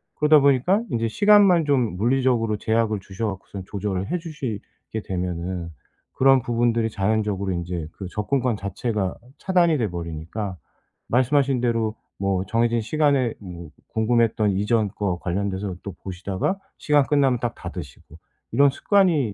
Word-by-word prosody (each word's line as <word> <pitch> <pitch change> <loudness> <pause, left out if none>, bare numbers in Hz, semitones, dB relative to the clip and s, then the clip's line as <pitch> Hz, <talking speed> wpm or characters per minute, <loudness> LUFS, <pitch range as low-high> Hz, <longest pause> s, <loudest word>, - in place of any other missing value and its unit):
그러다 150 0 +5
보니까 140 - +3
인제 115 0 0
시간만 200 - +5
좀 125 -10 +1
물리적으로 120 -1 +1
제약을 110 -1 0
주셔 95 +4 -4
갖고서 95 -1 -6
조절을 100 -1 -3
해 180 - +1
주시게 130 - -6
되면은 90 -1 -3 0.5
그런 135 -1 +5
부분들이 115 -1 +1
자연적으로 100 -1 -1
인제 85 -2 -3
그 95 - -8
접근권 120 +3 0
자체가 100 0 -2 0.2
차단이 175 -4 +2
돼 115 -6 0
버리니까 85 +4 -5 0.5
말씀하신 130 +1 +2
대로 115 -2 0 0.2
뭐 95 -1 -1
정해진 115 +3 +1
시간에 140 0 +1
뭐 85 -5 -9 0.2
궁금했던 110 -2 +2
이전 105 +3 +1
거 95 -3 -3
관련돼서 95 +1 -2
또 100 - -5
보시다가 95 - -2 0.2
시간 145 -3 +3
끝나면 135 -4 +2
딱 120 -1 -1
닫으시고 80 -3 -9 0.4
'이런 140 0 +5
습관이 155 - +2
110 Hz, 335 characters per minute, -23 LUFS, 95-130 Hz, 0.5 s, 그러다